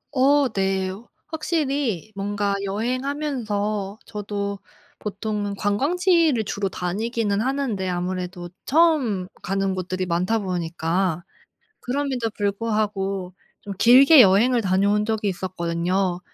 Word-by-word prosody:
어 280 +2 +4
네. 190 -3 -1 0.4
확실히 285 - -2
뭔가 200 0 -1
여행하면서 215 -3 -2
저도 200 -1 -4 0.4
보통은 205 0 -3
관광지를 305 - +2
주로 200 0 -2
다니기는 205 +3 -1
하는데 245 -7 -1
아무래도 180 0 -4 0.2
처음 275 - +2
가는 195 0 -1
곳들이 185 0 -3
많다 180 +5 0
보니까 175 -2 -1 0.6
그럼에도 255 -3 -2
불구하고 200 -3 -1 0.3
좀 200 - -7
길게 265 +5 +8
여행을 230 +5 +4
다녀온 200 +1 +2
적이 220 -2 -1
있었거든요. 180 0 -1
205 Hz, 255 characters per minute, -23 LUFS, 190-245 Hz, 0.6 s, 길게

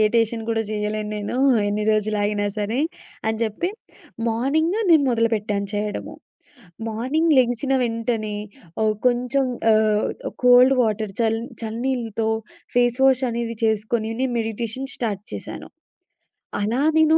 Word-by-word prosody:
టేషను 225 0 +1
కూడా 225 -1 +1
చేయలేను 210 0 -2
నేను. 210 +4 -3 0.3
ఎన్ని 210 +1 -1
రోజులు 215 0 +1
ఆగినా 205 0 0
సరే. 210 +4 -1 0.5
అని 220 0 0
చెప్పి 225 - -1 0.6
మార్నింగు 310 - +1
నేను 315 -4 +6
మొదలుపెట్టాను 215 -4 0
చేయడము. 210 0 -3 0.7
మార్నింగ్ 265 +9 +1
లెగిసిన 250 +2 +2
వెంటనే, 225 -2 -1 0.5
ఒ - - +3 0.2
కొంచెం 250 +2 +2 0.3
ఆహ్, 215 -1 +3 0.4
కోల్డ్ 250 +2 +7
వాటర్ 215 -2 -1
చ - - +4 0.4
చల్ల 220 0 -4
నీళ్లతో 230 -4 -1 0.5
ఫేస్ 245 0 +3
వాష్ 265 -1 +4
అనేది 230 -1 -3
చేసుకొని, 220 +1 0
నేను 260 -1 0
మెడిటేషన్ 225 +4 -4
స్టార్ట్ 210 -4 -3
చేశాను. - - -7 0.9
అలా 230 +6 0 0.2
నేను 315 0 +5
225 Hz, 120 wpm, -22 LUFS, 215-250 Hz, 0.9 s, కోల్డ్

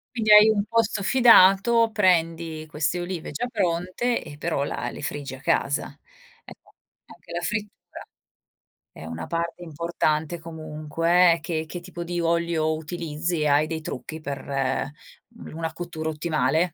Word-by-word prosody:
Quindi 215 -2 +1
hai 210 +1 +9
un 210 -2 +2
posto 220 -2 0
fidato, 230 -1 +6
prendi 165 -5 +1
queste 155 +3 -1
olive 175 -1 -5
già 245 - -3
pronte 185 +5 -1
e 145 - -10
però 140 - -1
la - - -3
le - - -9
friggi 145 -2 -5
a 130 - -14
casa. 140 +1 +1 0.6
Ecco, - - -16 0.3
anche - - -16
la 175 - -2
frittura 210 +3 -2 1.2
è - - -12
una 80 0 -6
parte 170 +1 -3
importante 160 0 -1
comunque, 165 +2 +1
eh, 165 - -6
che 160 -1 -3
che 175 +3 -7
tipo 175 -1 -7
di 175 0 -3
olio 170 -1 +1
utilizzi? 160 0 -3
Hai 145 +1 +3
dei 160 0 -4
trucchi 155 +2 -6
per, 140 -2 -6
mhmm, 140 - -5
una 165 -1 -3
cottura 165 -2 -5
ottimale? 155 -2 0
165 Hz, 145 wpm, -24 LUFS, 155-180 Hz, 1.2 s, hai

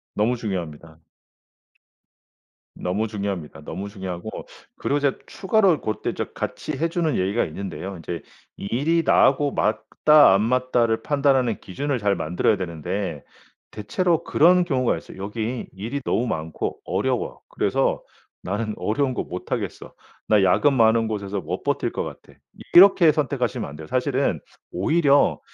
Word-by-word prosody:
너무 115 +4 +1
중요합니다. 85 -7 -6 1.8
너무 100 +5 -2
중요합니다. 100 -7 -5
너무 95 +6 -6
중요하고 95 0 -7 0.3
그리고 145 +1 -1
제가 140 -1 0
추가로 195 -5 +2
고때 110 -1 -3 0.2
같이 155 - -4
해 165 +5 0
주는 165 -2 0
얘기가 100 +5 +1
있는데요. 95 +2 -6
인제 85 -1 -6 0.3
일이 145 +11 0
나하고 140 0 +4
맞다 110 +3 +4
안 100 - +3
맞다를 120 -1 +1
판단하는 135 -5 +2
기준을 135 +7 -3
잘 100 -2 +1
만들어야 90 +5 +1
되는데 90 -2 -4 0.5
대체로 170 - 0
그런 180 +3 +4
경우가 130 -7 +1
있어요. - - -13
'여기 110 +5 -4
일이 115 +9 -4
너무 120 - 0
많고 80 -7 -3
어려워. - - -2
그래서 - - 0 0.4
나는 105 +3 -2
어려운 130 +4 -1
거 - - -2
못하겠어. 90 - -5 0.4
나 105 -2 +4
야근 140 +10 +4
많은 115 -1 +3
곳에서 100 -2 -3
못 75 - -5
버틸 - - 0
것 - - -2
같아.' - - -11 0.3
이렇게 175 -3 +8
선택하시면 135 - -1
안 70 - -9
돼요. 80 0 -9
사실은 130 - 0 0.3
오히려 145 - +2
110 Hz, 320 characters per minute, -23 LUFS, 95-140 Hz, 1.8 s, 이렇게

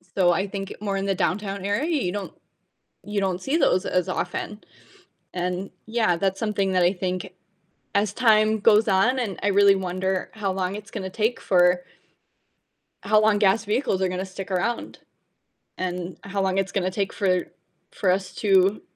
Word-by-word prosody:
So, 180 -2 +4
I 190 +4 0
think 195 0 -6
more 200 -2 -2
in 195 0 -2
the 195 - +1
downtown 195 +1 -2
area, 205 +9 0
you 180 -6 -1
don't 205 0 -5 0.7
you 210 0 -2
don't 190 -2 -1
see 275 - 0
those 230 - +2
as 180 0 0
often, 185 +3 -4 0.7
and 180 +2 -3 0.2
yeah, 220 -5 +1
that's 195 +2 -1
something 205 -3 0
that 185 -1 +3
I 175 +1 +4
think 185 -1 -3 0.6
as 205 0 +1
time 215 -2 +3
goes 215 +1 +5
on, 220 +7 +3
and 220 -7 -3
I 205 - +2
really 200 0 +5
wonder 190 0 -2
how 205 -3 -2
long 185 +1 -2
it's 210 -1 -10
gonna 190 -4 -5
take 225 +4 -1
for 180 -1 +3 1.2
How 215 +1 +4
long 215 -1 +3
gas 205 +2 +3
vehicles 210 -3 0
are 190 - +2
gonna 185 +1 -3
stick 190 +1 -8
around, 210 +6 -2 0.8
and 180 0 -4
how 200 0 -2
long 190 0 0
it's 195 0 -1
gonna 185 -2 0
take 195 +1 -2
for 185 -3 +1 0.5
for 190 - 0
us 185 0 -1
to 195 0 +3
195 Hz, 175 wpm, -24 LUFS, 185-210 Hz, 1.2 s, goes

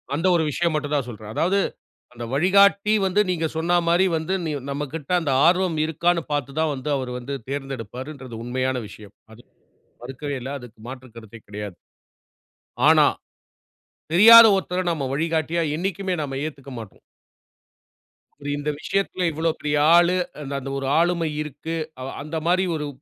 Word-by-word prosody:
அந்த 170 +5 0
ஒரு 165 - +2
விஷயம் 170 +3 0
மட்டும் 150 -1 -2
தான் 135 -4 -1
சொல்றேன். 110 -1 -9
அதாவது, 190 +4 +2 0.5
அந்த 120 -1 -7
வழிகாட்டி 200 +5 +4
வந்து 190 +3 +2
நீங்க 165 -2 0
சொன்ன 175 +2 +2
மாரி 175 +3 +4
வந்து, 160 +4 -2
நி 155 - -2 0.2
நம்மகிட்ட 145 +3 -5
அந்த 150 -5 -1
ஆர்வம் 180 -2 +2
இருக்கான்னு 170 +2 0
பார்த்து 145 0 -3
தான் 160 -1 +1
வந்து, 140 +3 -5
அவரு 130 -2 -4
வந்து 135 +3 -6
தேர்ந்தெடுப்பாருன்றது 130 -2 -6
உண்மையான 130 +1 -1
விஷயம். 105 0 -14 0.2
அது 120 - -16 0.6
மறுக்கவே 140 +3 -5
இல்ல. 130 +3 -6
அதற்கு 120 -2 -14
மாற்று 130 -1 -9
கருத்தே 115 0 -12
கிடையாது. 105 -2 -7 1.1
ஆனா, - - +6 1.1
தெரியாத 230 +5 +10
ஒருத்தரை 185 -1 -2
நாம 145 -5 -2
வழிகாட்டியா 165 +2 0
என்னைக்குமே 190 +1 -2
நாம 135 -2 -4
ஏத்துக்க 140 -3 -9
மாட்டோம். 110 -4 -11 1.6
இந்த 145 +1 -3
விஷயத்துல 185 +1 -1
"இவ்வளோ 160 +2 0
பெரிய 150 0 -1 0.2
ஆளு, 175 +1 +4 0.4
அந்த 135 0 -6
ஒரு 135 -1 -3
ஆளுமை 170 -1 +1
இருக்கு" 150 +2 -6 0.3
அவ 130 - -5
அந்த 155 +2 -5
மாதிரி 185 +2 +3
ஒரு 150 -1 -3
150 Hz, 145 wpm, -23 LUFS, 130-175 Hz, 1.6 s, தெரியாத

